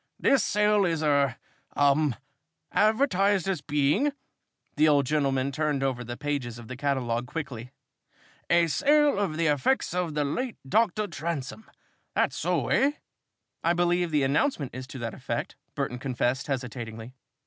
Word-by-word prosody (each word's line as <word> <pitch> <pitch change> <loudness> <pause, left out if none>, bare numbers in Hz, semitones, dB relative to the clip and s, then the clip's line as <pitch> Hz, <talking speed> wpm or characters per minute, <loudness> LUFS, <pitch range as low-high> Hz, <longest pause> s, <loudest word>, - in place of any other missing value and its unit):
This 270 -6 +3
sale 210 0 +3
is 165 -4 0
er 140 -4 +2 0.4
um 145 -1 +3 0.6
advertised 205 -4 +2
as 190 -5 -1
being 150 - +1 0.3
" - - -48
the 155 - +4
old 145 -2 +4
gentleman 135 -2 0
turned 145 -1 -1
over 130 -2 -1
the 120 +1 -6
pages 140 -6 -3
of 120 -2 -11
the 130 - -6
catalogue 125 -3 -1
quickly 125 -6 -6 0.8
"a 170 0 +5
sale 290 - +3
of 180 -7 -1
the 165 - +1
effects 150 - +1
of 175 -4 -2
the 150 -1 +1
late 245 - -3
Doctor 215 +3 +2
Transome. 165 +1 -5 0.5
That's - - +1
so, - - -1
eh?" 280 +2 +3 0.7
"I 170 - +3
believe 175 0 +1
the 150 -3 +2
announcement 145 - 0
is 130 +1 -7
to 140 - -9
that 115 -2 -4
effect," - - -4 0.2
Burton 125 - -3
confessed, 125 0 -1
hesitatingly. 120 -3 -5
150 Hz, 150 wpm, -27 LUFS, 130-180 Hz, 0.8 s, a